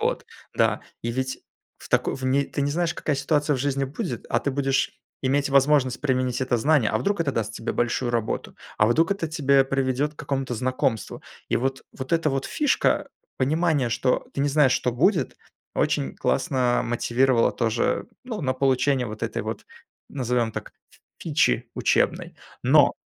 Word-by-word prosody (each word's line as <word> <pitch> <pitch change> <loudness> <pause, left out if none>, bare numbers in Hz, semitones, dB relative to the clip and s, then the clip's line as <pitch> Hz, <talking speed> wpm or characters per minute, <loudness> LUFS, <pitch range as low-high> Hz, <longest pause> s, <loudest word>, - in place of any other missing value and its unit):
Вот. - - -1 0.3
Да. - - +2 0.2
И 115 - -2
ведь 130 +2 -2 0.4
в - - -13
тако - - +1
в 130 - -7
не 135 +2 +2
ты 140 - -3
не 140 - 0
знаешь, 170 +2 0
какая 145 -3 -1
ситуация 145 -1 +1
в - - -5
жизни 140 +1 0
будет, 160 - -5
а - - +2
ты 140 - -1
будешь 135 0 0 0.3
иметь 140 +2 +1
возможность 140 -2 +3
применить 130 -3 0
это 130 -2 +1
знание. 140 -2 +3
А 110 - +1
вдруг 200 - -1
это 145 -4 0
даст 110 -3 -2
тебе 115 - -4
большую 120 +1 0
работу, 115 -2 -2 0.2
а 105 - +5
вдруг 165 - +3
это 170 -5 -3
тебя 140 -4 +3
приведет 135 +2 0
к - - -36
какому-то 135 -3 -2
знакомству. 125 -2 -1 0.3
И - - +2
вот, 135 +2 -2
вот 130 +3 -6
эта 165 -3 +2
вот 135 0 -2
фишка, 295 -2 +1 0.3
понимание, 150 -1 +1
что 125 +2 0
ты - - -2
не 145 - +2
знаешь, 140 -2 +4
что 125 -1 0
будет, 155 - +1 0.4
очень 70 -1 0
классно 125 -2 +1
мотивировало 120 +1 +2
тоже, 115 -1 0 0.2
ну, 225 -5 -5
на 130 -4 0
получение 130 -1 +2
вот 110 0 -8
этой - - -2
вот, - - -5 0.4
назовем 125 -4 -1
так, - - -6 0.2
ф - - -22 0.2
фичи 145 - +1
учебной. - - +1 0.3
Но, - - +5
135 Hz, 175 wpm, -24 LUFS, 125-145 Hz, 0.4 s, а